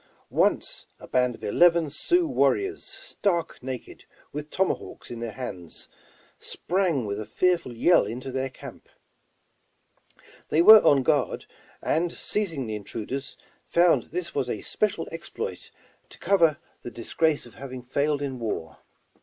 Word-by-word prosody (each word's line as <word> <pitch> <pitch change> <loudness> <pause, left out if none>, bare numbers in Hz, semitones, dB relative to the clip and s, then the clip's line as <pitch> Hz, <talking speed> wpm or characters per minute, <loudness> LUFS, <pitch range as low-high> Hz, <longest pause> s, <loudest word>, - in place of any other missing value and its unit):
Once - - +1
a - - -11
band 125 -1 +1
of - - -18
eleven 170 +7 +4
Sioux 340 - +1
warriors, 390 - +1
stark 170 -5 -3
naked, 130 -2 -7 0.3
with 150 +1 -5
tomahawks 190 -7 -2
in 120 - -6
their 115 -2 -5
hands, 90 -10 -8 0.5
sprang 175 - -1
with 100 0 -3
a - - -3
fearful 180 -8 +1
yell 120 - +4
into 125 +5 -5
their 130 +1 -2
camp. 130 - -12 1.6
They 160 +2 +4
were 215 +2 +11
on 140 -2 +5
guard, 150 +1 +1 0.4
and 170 +2 +1
seizing 170 -12 -2
the 110 - -4
intruders 115 +6 -5 0.3
found 175 0 +4
this 175 0 -5
was 135 -3 -1
a 105 - -3
special 200 -6 -1
exploit 170 - -6 0.4
to - - -14
cover 165 -6 +3 0.2
the - - -6
disgrace 145 +7 0
of 120 - -14
having 130 -2 -8
failed 145 +3 0
in 135 -3 -4
war. 85 -8 -4
145 Hz, 140 wpm, -26 LUFS, 125-170 Hz, 1.6 s, were